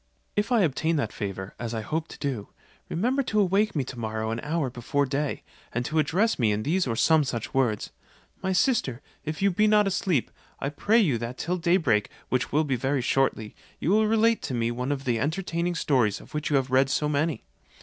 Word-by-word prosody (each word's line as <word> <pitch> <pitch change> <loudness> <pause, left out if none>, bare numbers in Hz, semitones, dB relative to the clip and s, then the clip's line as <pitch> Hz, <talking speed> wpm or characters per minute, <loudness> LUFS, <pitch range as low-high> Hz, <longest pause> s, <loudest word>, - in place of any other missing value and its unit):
If 205 +4 0
I 235 -3 +4
obtain 160 0 +1
that 125 -8 -1
favour, 95 -1 -5
as 120 -1 -4
I 110 - -2
hope 160 +9 -3
to - - -11
do, 130 -8 -3 0.4
remember 250 +10 +1
to 220 -5 0
awake 200 +1 +2
me 145 - +1
to 125 -1 -8
morrow 110 0 -2
an 115 - -2
hour 150 -2 -1
before 135 +4 0
day, 140 +2 -2 0.3
and 120 +1 -2
to 155 +5 0
address 180 +9 +1
me 110 -4 +3
in 105 +1 -1
these 175 +5 +1
or 115 - -1
some 160 +6 +4
such 120 -5 -4
words: 120 -6 0 0.5
'My 190 - -1
sister, 190 - +1 0.2
if 155 +5 -3
you 200 - +4
be 210 +4 +3
not 210 0 +5
asleep, 185 -7 0 0.3
I 140 - -1
pray 205 +10 +2
you 155 - +3
that 120 +2 -5
till 180 +2 -1
day 175 +1 +3
break, 105 - +1 0.2
which 130 -1 0
will 155 +2 +3
be 140 -4 0
very 135 +2 0
shortly, 120 -5 0 0.2
you 170 - 0
will 215 +1 +4
relate 225 +1 +3
to 130 - -3
me 115 0 0
one 125 +3 -2
of 140 -1 -2
the 120 -3 +1
entertaining 170 +4 -1
stories 125 -10 +1
of - - -16
which 150 0 -2
you 145 - +2
have 135 -1 +1
read 130 +1 +4
so 150 +2 +1
many.' 150 +1 0
145 Hz, 220 wpm, -26 LUFS, 120-180 Hz, 0.5 s, not